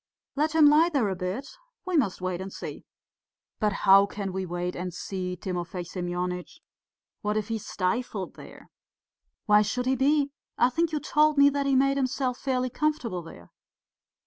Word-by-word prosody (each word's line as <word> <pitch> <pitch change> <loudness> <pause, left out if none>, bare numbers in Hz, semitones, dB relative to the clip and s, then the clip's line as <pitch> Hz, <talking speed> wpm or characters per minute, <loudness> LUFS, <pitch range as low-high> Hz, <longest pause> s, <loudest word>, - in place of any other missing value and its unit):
Let 305 +2 0
him 315 -2 +7
lie 305 +3 +6
there 260 -9 +1
a 190 - -2
bit. 185 +10 -4 0.4
We 370 -2 -2
must 220 - +1
wait 185 -1 -2
and 190 +1 -6
see...." - - -8 0.7
"But 210 -2 +2
how 195 +1 +7
can 200 -2 -5
we 190 -1 -3
wait 175 +1 -3
and 180 +1 -4
see, 180 +1 -4
Timofey 180 -1 -4
Semyonitch? 180 0 -4 0.6
What 210 0 -1
if 215 0 -2
he 225 - -1
is 215 - -10
stifled 195 0 -2
there?" - - -14 0.7
"Why 210 0 +6
should 250 +4 -1
he 260 +1 +2
be? 280 +2 +2 0.3
I 250 - +4
think 330 +4 0
you 305 - -1
told 300 0 +2
me 280 0 +7
that 280 0 -1
he 275 - +3
made 275 +1 +3
himself 255 -1 -1
fairly 255 -2 -1
comfortable 255 - -1
there?" 85 - -13
215 Hz, 175 wpm, -27 LUFS, 185-275 Hz, 0.7 s, him